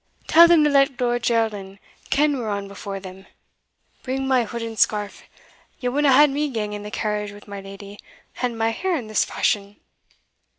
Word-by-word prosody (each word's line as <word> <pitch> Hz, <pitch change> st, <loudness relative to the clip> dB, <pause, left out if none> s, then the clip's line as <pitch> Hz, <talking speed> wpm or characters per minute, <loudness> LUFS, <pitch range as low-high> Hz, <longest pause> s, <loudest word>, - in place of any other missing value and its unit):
Tell 335 Hz, +2 st, +7 dB
them 335 Hz, -3 st, +5 dB
to 300 Hz, -, +4 dB
let 275 Hz, -2 st, +3 dB
Lord 240 Hz, -1 st, 0 dB
Geraldin 215 Hz, -5 st, -1 dB, 0.3 s
ken 295 Hz, +1 st, +2 dB
we're 225 Hz, -3 st, -3 dB
on 200 Hz, -1 st, -3 dB
before 200 Hz, 0 st, -7 dB
them. 190 Hz, 0 st, -11 dB, 0.7 s
Bring 265 Hz, +1 st, -3 dB
my 255 Hz, -3 st, +2 dB
hood 235 Hz, +2 st, -6 dB
and 225 Hz, -1 st, -6 dB
scarf 210 Hz, -1 st, 0 dB, 0.6 s
ye 250 Hz, -, -1 dB
wadna 285 Hz, +2 st, +2 dB
hae 285 Hz, +3 st, +7 dB
me 295 Hz, +1 st, -1 dB
gang 215 Hz, -5 st, -3 dB
in 205 Hz, -, -5 dB
the 210 Hz, -, -7 dB
carriage 210 Hz, -1 st, -3 dB
wi' 205 Hz, 0 st, -13 dB
my 200 Hz, -1 st, -8 dB
leddy, 195 Hz, +1 st, -11 dB, 0.4 s
and 245 Hz, -2 st, -1 dB
my 225 Hz, 0 st, +1 dB
hair 365 Hz, +10 st, -1 dB
in 255 Hz, -8 st, -4 dB
this 215 Hz, 0 st, +1 dB
fashion?" 200 Hz, 0 st, -1 dB
225 Hz, 185 wpm, -22 LUFS, 205-270 Hz, 0.7 s, Tell